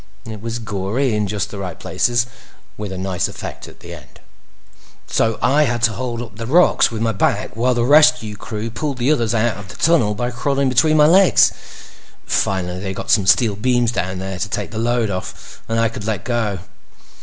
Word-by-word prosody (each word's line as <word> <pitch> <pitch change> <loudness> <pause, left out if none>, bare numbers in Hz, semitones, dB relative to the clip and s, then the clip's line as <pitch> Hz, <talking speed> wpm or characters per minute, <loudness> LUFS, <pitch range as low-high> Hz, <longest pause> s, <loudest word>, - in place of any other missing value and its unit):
It 110 -3 -8
was 115 +1 -4
gory 110 +4 -2
in 105 -1 0
just 100 0 -3
the 100 - -7
right 90 -4 -6
places, 120 0 0 0.5
with 105 -2 -6
a 95 - -5
nice 95 -1 -1
effect - - -8
at - - -15
the - - -9
end. - - -14 0.9
"—so 115 -1 0
I 150 +3 +4
had 120 -2 -2
to 115 - +4
hold 120 0 -4
up 110 -4 -12
the 115 0 -5
rocks 175 +7 +4
with 115 -1 -4
my 115 - +1
back 105 0 -1
while 125 +2 +1
the 120 0 +1
rescue 125 -7 +4
crew 110 +2 -6
pulled 140 +3 -3
the 125 +4 +1
others 115 -6 +1
out 115 0 +1
of 100 -2 -10
the - - -11
tunnel 145 -11 +2
by 120 +3 -2
crawling 135 +2 0
between 155 +5 +3
my 150 - +6
legs. 185 +4 +5 0.7
Finally, 90 -2 -1
they 95 0 -5
got - - -4
some 100 -3 +3
steel 105 +2 +4
beams 120 +2 +1
down 95 -5 -3
there 95 0 -5
to 105 - -2
take - - -4
the 110 - -4
load 120 -2 0
off, 95 -1 -7
and 115 0 0
I 115 - +3
could 110 -2 -7
let 105 -4 -2
go. 115 -5 -1
115 Hz, 210 wpm, -19 LUFS, 100-125 Hz, 0.9 s, my